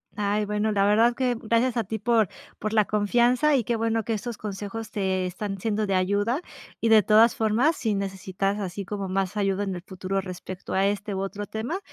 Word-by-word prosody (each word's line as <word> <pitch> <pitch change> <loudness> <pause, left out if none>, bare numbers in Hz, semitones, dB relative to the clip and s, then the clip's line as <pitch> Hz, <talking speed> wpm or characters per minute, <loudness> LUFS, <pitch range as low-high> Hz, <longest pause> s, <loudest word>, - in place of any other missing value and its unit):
Ay, 210 0 0
bueno, 210 +1 0
la 200 -1 +2
verdad 225 +4 +4
que 250 -1 +1
gracias 230 +2 +1
a 230 - +1
ti 220 +4 -3
por 220 -2 +2 0.3
por 215 +1 -3
la 215 -2 +4
confianza, 240 +8 +3
y 255 - +2
qué 235 +2 -1
bueno 225 0 0
que 225 - -2
estos 220 +1 -4
consejos 210 +2 -6
te 190 -3 0
están 195 +2 -4
siendo 215 +1 -1
de 195 - +1
ayuda. 205 - +1 0.4
Y 230 - +1
de 220 -1 +7
todas 220 +2 +5
formas, 230 +9 +2
si 220 -3 0
necesitas 195 +1 -2
así 195 0 -4
como 200 +1 -4
más 195 +2 -1
ayuda 195 0 +1
en 195 -1 -2
el 175 - -6
futuro 190 +1 -3
respecto 185 0 -7
a 190 +1 +3
este, 205 0 -1
u 190 - -2
otro 200 +1 -4
tema, 240 - -3
210 Hz, 210 wpm, -25 LUFS, 195-225 Hz, 0.4 s, de